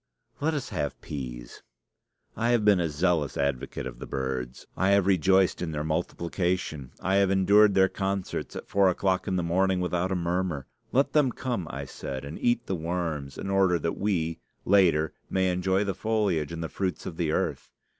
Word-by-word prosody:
Let 155 +2 0
us 140 - -3
have 75 -9 -3
peas. - - -7 0.7
I 115 - 0
have 120 -3 +3
been 100 -3 +5
a 85 -2 0
zealous 80 -1 0
advocate 70 -2 -2
of - - -7
the - - -7
birds. 65 -2 -4
I 95 - +2
have 100 -1 +4
rejoiced 95 0 +3
in 80 -3 -3
their 75 0 -2
multiplication. 85 -2 -2
I 95 +1 +2
have 100 -1 +4
endured 100 +2 +5
their 95 0 +6
concerts 95 -1 -3
at - - -7
four 100 -1 +4
o'clock 95 +1 0
in 95 - 0
the 90 - 0
morning 95 +2 +2
without 90 +1 -1
a - - +1
murmur. 85 -4 -1 0.3
Let 135 +3 +2
them 145 -4 +4
come, 120 -9 -3
I 70 0 -5
said, 65 0 -6
and 75 +3 -7
eat 120 -1 +1
the - - -2
worms, 80 -5 -3
in 95 - -4
order 95 -2 +3
that 85 +1 -2
we, 85 -5 0 0.3
later, 85 -6 +4 0.2
may 95 -1 +2
enjoy 95 +2 +1
the 100 -1 -1
foliage 100 -7 0
and 85 0 -4
the - - -2
fruits 95 -2 -3
of 80 - -6
the 80 -3 0
earth. - - -1
90 Hz, 190 wpm, -27 LUFS, 80-95 Hz, 0.7 s, their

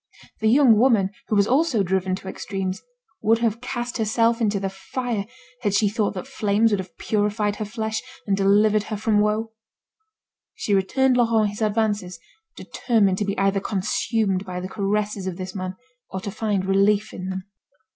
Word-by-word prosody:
The 220 - +1
young 245 -3 +6
woman, 220 -6 +3 0.2
who 215 - 0
was 200 -1 +4
also 260 -3 +2
driven 190 0 0
to 190 - -10
extremes, 190 0 -4 0.4
would 225 +2 +4
have 230 -1 -1
cast 245 -1 -4
herself 230 +2 +2
into 205 -2 +1
the 195 - -2
fire 220 +1 -4 0.3
had 205 -4 0
she 205 +1 +3
thought 210 -1 -1
that 185 - -5
flames 215 +2 +1
would 205 - +1
have 185 -1 -8
purified 210 0 0
her 215 - -3
flesh, 220 0 -3 0.2
and 200 - +1
delivered 205 +2 +3
her 215 - -4
from 215 0 +1
her - - +5
woe. 215 +2 0 1.0
She 205 - -1
returned 250 +7 +2
Laurent 225 -3 +3
his 205 - -9
advances, 210 -4 0 0.4
determined 200 -6 +1
to 210 - 0
be 200 0 -2
either 195 0 +2
consumed 195 0 -1
by 180 -2 -5
the 185 - -5
caresses 205 0 -2
of 180 -2 -4
this 185 -1 -6
man, 185 -1 -4 0.3
or 190 - -4
to 200 - -5
find 205 -3 -1
relief 200 +2 +2
in 185 +1 -5
them. 190 0 -4
210 Hz, 180 wpm, -23 LUFS, 195-225 Hz, 1.0 s, young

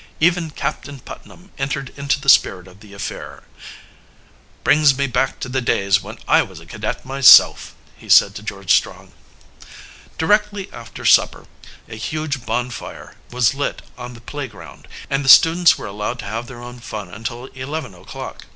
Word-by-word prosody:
Even 170 0 +2
Captain 140 -1 -5
Putnam 180 +9 -13
entered 135 -1 -3
into 140 0 -1
the 140 - -12
spirit 95 -8 +4
of 95 +1 -17
the 105 -1 -16
affair. 100 - -8 1.2
"Brings 150 -3 +4
me 140 - +1
back 130 0 -1
to - - -4
the 130 +1 -2
days 100 -4 +1
when - - -10
I - - +5
was - - -8
a - - -15
cadet - - -5
myself," 135 0 +6 0.2
he - - -16
said 100 - +6
to 100 - -8
George 100 -3 -1
Strong. - - -1 1.1
Directly 205 +3 0
after 120 -1 -10
supper - - +3 0.4
a 110 - -10
huge 145 0 -4
bonfire 120 +2 -5 0.2
was 125 -1 +1
lit 140 0 -4
on 125 0 -9
the 120 - -14
playground, 135 -5 -9 0.2
and 135 +1 -1
the 135 - 0
students 170 +4 +7
were - - -8
allowed 105 +4 -4
to 110 - -8
have 115 +4 -5
their 120 -2 -11
own 125 0 -10
fun 105 -5 -7
until 120 +4 -6
eleven 130 -2 -6
o'clock. 90 - -10
130 Hz, 165 wpm, -19 LUFS, 110-140 Hz, 1.2 s, students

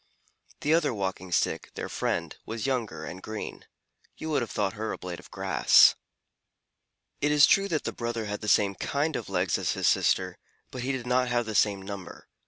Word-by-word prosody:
The 150 - +2
other 165 -7 +2
Walking 95 -2 -4
Stick, 85 - 0
their - - -4
friend, - - -2
was 115 +1 -5
younger 115 - -2
and 90 +6 -8
green. 110 +1 -7 0.5
You 160 - -5
would 145 - +2
have 120 - -3
thought 100 -1 -1
her 110 0 -4
a - - -4
blade 90 -1 -6
of - - -15
grass. - - +5 1.3
It 150 +1 +2
is 150 0 +7
true 195 0 +4
that 160 -6 -1
the - - -3
brother 115 -1 -3
had 105 0 -4
the 105 - -5
same 100 -1 +4
kind 150 - -1
of 110 - -4
legs 95 -1 0
as - - 0
his - - 0
sister, - - +2 0.3
but 125 - -5
he 130 +2 -1
did 130 -3 -4
not 125 +1 +2
have 120 -1 0
the 110 - -4
same 100 -1 +2
number. 100 -1 -8
110 Hz, 200 wpm, -28 LUFS, 100-130 Hz, 1.3 s, is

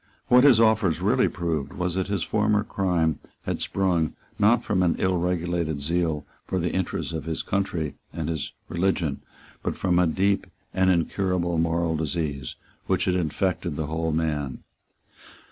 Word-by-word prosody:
What 125 +1 +7
his 130 -6 +7
offers 110 -7 +3
really - - +3
proved 80 -5 -2
was 90 -1 -1
that 95 +1 -1
his 100 -4 -1
former 105 0 +2
crime 90 -7 0 0.2
had - - -3
sprung, 90 -5 +1 0.3
not 110 +3 +4
from 95 -3 +1
an 90 -2 +3
ill 95 -1 +1
regulated 85 -3 -1
zeal 80 0 0 0.2
for 95 - -1
the 85 0 0
interests 95 -2 -2
of 80 -2 -4
his 80 -1 -2
country 95 -6 -1 0.2
and 80 -2 -4
his 80 -3 -3 0.2
religion, 85 -5 0 0.4
but - - -3
from 90 -2 +2
a 90 - +4
deep 95 +4 +1 0.3
and 95 0 +3
incurable 90 -1 +1
moral 85 0 +1
disease 75 -3 -2 0.3
which - - +1
had 90 - +2
infected 90 -1 -1
the 80 - -2
whole 80 +2 -1
man. 75 -4 -2
85 Hz, 160 wpm, -25 LUFS, 80-95 Hz, 0.4 s, What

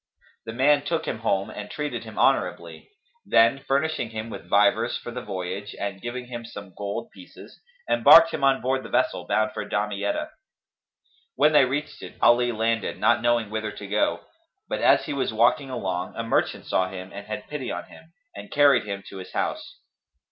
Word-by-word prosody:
The 110 - -5
man 145 +4 +3
took 165 +1 -2
him 110 - -3
home 105 -2 -1
and 105 0 -8
treated 150 -1 -4
him - - -11
honourably; - - 0 0.3
then, 115 +4 +4
furnishing 140 -2 -1
him 110 0 -6
with - - -9
vivers 115 +3 +3
for 120 - -8
the 125 +1 -5
voyage 95 -1 -5
and 100 -1 -4
giving 125 +1 -5
him 120 -1 -7
some 100 -5 -10
gold 100 - -5
pieces, - - -15 0.3
embarked 165 0 +7
him 140 - -4
on 135 -1 +3
board 130 +1 0
the - - -10
vessel - - 0
bound 110 0 +1
for - - -5
Damietta. 100 -1 -2 1.0
When 150 +3 +4
they 145 -3 +6
reached 140 +2 -4
it, - - -10
Ali 120 +1 +4
landed, 115 0 -1
not 120 0 +3
knowing 120 -3 +1
whither 110 0 -3
to 100 - -9
go; 105 +2 0 0.5
but - - -3
as - - +4
he - - -4
was 135 -4 -1
walking 125 +6 +2
along, 95 -7 -4
a 115 - -3
merchant 115 - 0
saw 95 0 0
him 95 0 -8
and 100 +1 -9
had 110 - -6
pity 150 -4 -5
on - - -4
him, 160 0 -17 0.2
and 100 0 -9
carried 140 -5 +4
him 100 -1 -5
to 95 - -10
his 95 0 -10
house. - - -3
115 Hz, 190 wpm, -25 LUFS, 100-135 Hz, 1.0 s, embarked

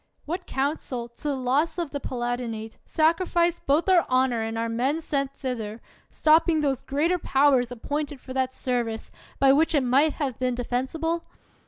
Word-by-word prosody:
What 350 +4 -4
council, 265 -3 -2
to 235 +5 -8
the 285 - 0
loss 265 +7 0
of 340 -4 -2
the 285 - -3
Palat 245 -2 -2
inate, 225 -2 -6
sacrificed 340 +1 +1
both 295 +6 +3
our 370 -3 +5
honor 255 -2 +2
and 225 0 -3
our 230 0 -1
men 255 +7 0
sent 275 -4 -1
thither, 230 -5 -4 0.3
stopping 315 0 +3
those 275 -4 0
greater 325 +6 0
powers 270 -5 +3
ap 240 -2 -9
pointed 290 -1 -3
for 260 - -9
that 260 -1 0
service, 240 -4 -3 0.3
by 270 -1 +5
which 320 +3 +3
it 285 - +3
might 275 +5 +3
have 270 -6 -3
been 255 -1 0
defensible? 305 +8 -2
270 Hz, 175 wpm, -25 LUFS, 245-310 Hz, 0.3 s, our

